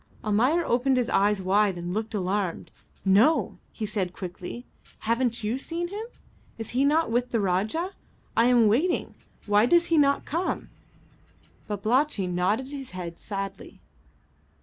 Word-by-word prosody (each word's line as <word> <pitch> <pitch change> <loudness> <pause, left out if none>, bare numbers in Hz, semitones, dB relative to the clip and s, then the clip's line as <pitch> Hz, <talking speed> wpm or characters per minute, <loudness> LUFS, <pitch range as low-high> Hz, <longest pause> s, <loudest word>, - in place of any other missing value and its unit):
Almayer 250 +11 +2
opened 255 +2 +2
his 245 -2 0
eyes 200 0 +2
wide 195 0 +2
and 175 +1 -4
looked 220 +1 -3
alarmed. 190 -2 -2 0.3
"No," 215 +12 +3
he 220 - -4
said 195 -4 -2
quickly; 185 +7 -7 0.4
"haven't 235 0 0
you 225 +5 -1
seen 340 +4 -3
him? 420 +4 -5 0.5
Is 225 -2 -5
he 255 +3 +2
not 300 -1 +2
with 245 +1 +1
the 230 - 0
Rajah? 210 - 0 0.4
I 230 - +4
am 245 -2 +5
waiting; 290 - +1 0.3
why 210 +2 +4
does 345 +4 +4
he 320 - +5
not 280 -1 +3
come?" 335 +5 -2 1.0
Babalatchi 215 +2 +1
nodded 185 +9 0
his 270 -6 -7
head 170 -2 -6
sadly. 195 -1 -6
225 Hz, 145 wpm, -26 LUFS, 195-270 Hz, 1.0 s, am